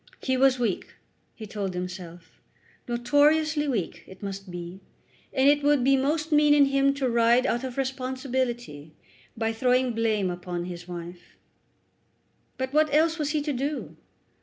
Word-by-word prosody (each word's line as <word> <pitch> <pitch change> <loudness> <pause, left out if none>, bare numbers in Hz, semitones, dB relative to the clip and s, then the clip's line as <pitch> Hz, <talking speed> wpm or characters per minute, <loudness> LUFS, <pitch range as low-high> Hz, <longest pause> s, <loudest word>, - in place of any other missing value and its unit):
He 260 - +1
was 260 0 +4
weak, 230 -6 -2 0.4
he 220 - -8
told 200 -3 -4
himself; 180 -1 -8 0.5
notoriously 295 +5 +2
weak, 225 -11 -3
it 190 +1 -13
must 195 -1 -6
be; 175 +1 -7 0.5
and 265 0 +2
it 290 0 +5
would 290 -2 +3
be 270 +2 +4
most 305 +4 0
mean 295 -1 +5
in 285 -1 +6
him 275 0 +2
to 275 -2 -1
ride 235 +1 +3
out 240 -1 0
of 260 -1 -6
responsibility 255 - -3 0.4
by 225 0 -1
throwing 250 +1 +2
blame 215 -4 0
upon 175 0 -5
his 175 -1 -8
wife. 175 0 -9 1.2
But 260 +1 -3
what 305 0 +3
else 320 +2 +2
was 295 -1 -1
he 300 -1 0
to 295 -1 -2
do? 280 +3 -3
255 Hz, 155 wpm, -26 LUFS, 195-280 Hz, 1.2 s, in